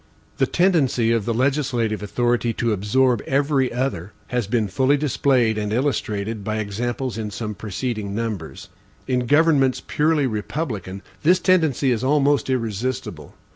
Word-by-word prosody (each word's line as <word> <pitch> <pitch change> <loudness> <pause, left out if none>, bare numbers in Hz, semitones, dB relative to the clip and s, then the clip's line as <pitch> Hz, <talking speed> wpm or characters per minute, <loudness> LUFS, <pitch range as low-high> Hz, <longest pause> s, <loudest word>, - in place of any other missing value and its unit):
The - - +3
tendency 145 -11 +2
of 115 -3 +1
the 115 - 0
legislative 125 -5 0
authority 120 +2 0
to 115 -1 0
absorb 120 +4 +2
every 135 -1 +1
other, 120 -7 -3 0.2
has 125 -5 -1
been 110 -1 0
fully 130 +8 +2
displayed 130 -6 +1
and 105 0 -3
illustrated 110 -4 -1
by 110 +1 -2
examples 115 +4 -3
in 105 -1 -3
some 105 +1 -5
preceding 105 0 -4
numbers. 105 -6 -5 0.4
In 125 -2 -1
governments 145 -3 +3
purely 150 -1 +1
republican, 105 - -4 0.2
this 180 +4 +4
tendency 160 -8 +2
is 120 0 -1
almost 145 0 +2
irresistible. 125 +1 -3
120 Hz, 135 wpm, -22 LUFS, 110-135 Hz, 0.4 s, this